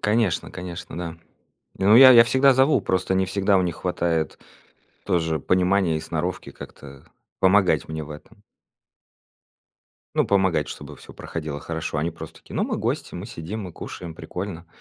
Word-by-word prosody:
Конечно, 105 -3 0
конечно, 90 -2 -8
да. 85 -2 -5 0.6
Не, 95 - 0
ну, 110 +3 +7
я 130 0 +10
я 115 -2 +9
всегда 130 +2 +4
зову, 135 +3 +4
просто 95 0 0
не 95 0 +1
всегда 100 +1 +2
у - - +2
них 85 -3 -2
хватает 85 -3 -1 0.7
тоже 80 -3 0
понимания 90 -1 +2
и - - -4
сноровки 85 +3 -4
как-то 70 -1 -12 0.3
помогать 95 0 +3
мне 80 -1 -5
в 75 - -12
этом. 105 +8 -13 1.7
Ну, - - +2
помогать, 95 -6 +2
чтобы - - -9
всё - - -14
проходило 75 -3 -6
хорошо. 80 -1 -4
Они 80 +3 -1
просто 80 - -11
такие: - - -13
"Ну, - - +1
мы - - -2
гости, - - -3
мы 90 +3 -6
сидим, 105 +1 -6
мы 90 -3 -8
кушаем, 85 -3 -8
прикольно. 90 +1 -7
90 Hz, 165 wpm, -23 LUFS, 80-100 Hz, 1.7 s, я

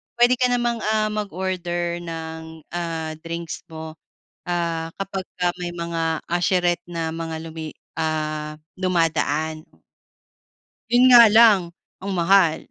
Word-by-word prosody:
puwede 245 +1 +4
ka 250 - +4
namang, 240 -1 0
ah, 215 0 +1
mag-order 180 -4 -3
ng, 160 -1 -7
ah, 165 -2 -3
drinks 170 0 -6
mo, 160 0 -7 0.6
ah, 170 -2 -2
kapag 195 0 -3 0.2
ka 175 0 +1
may 175 -1 -4
mga 165 -1 -1
usherette 175 -1 +1
na 165 -1 -2
mga 165 -1 -4
lumi, 160 -1 -6 0.3
ah, 155 -1 -2 0.2
dumadaan. 160 -3 0 1.3
Yun 250 +1 +6
nga 235 -2 +10
lang 220 -2 +7 0.4
ang 200 +1 -5
mahal. 175 -2 +3
170 Hz, 120 wpm, -22 LUFS, 160-190 Hz, 1.3 s, nga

